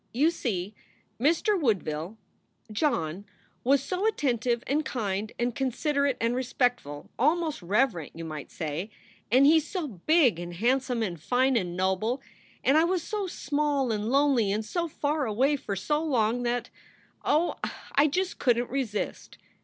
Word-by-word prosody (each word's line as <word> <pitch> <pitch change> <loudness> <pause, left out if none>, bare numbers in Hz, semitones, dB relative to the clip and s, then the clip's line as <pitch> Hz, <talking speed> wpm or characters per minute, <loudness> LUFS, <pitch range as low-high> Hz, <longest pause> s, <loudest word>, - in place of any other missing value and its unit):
You 300 +6 +4
see, 205 - -3 0.5
Mr. 335 - +2
Woodville 185 - -1 0.5
John 195 - 0 0.4
was 275 +2 +3
so 375 +6 -1
attentive 245 - 0
and 300 +3 +1
kind 210 -5 -2
and 240 0 0
considerate 280 +2 0
and 230 +1 +1
respectful 245 - -1
almost 315 +1 +1
reverent, 195 - 0
you 165 0 -6
might 155 -3 -6
say 160 +5 -4 0.4
and 260 +3 +6
he 315 +3 +7
s 315 - 0
so 345 0 -3
big 250 - +3
and 175 0 -6
handsome 245 +3 +1
and 175 -7 -4
fine 255 +7 +2
and 180 -5 -1
noble, 190 +7 0 0.4
and 285 +4 +5
I - - +4
was 350 0 0
so 415 -1 -3
small 285 -5 0
and 215 0 -1
lonely 270 -6 +3
and 215 +2 -1
so 340 +7 -2
far 295 -2 -1
away 260 +7 +2
for 205 -7 -4
so 295 - 0
long 245 -5 +1
that 245 0 -2 0.5
oh, 320 +4 +2 0.4
I 290 +2 +5
just 365 +6 -1
couldent 240 -2 +1
resist. 250 -6 -3
250 Hz, 155 wpm, -27 LUFS, 210-295 Hz, 0.5 s, he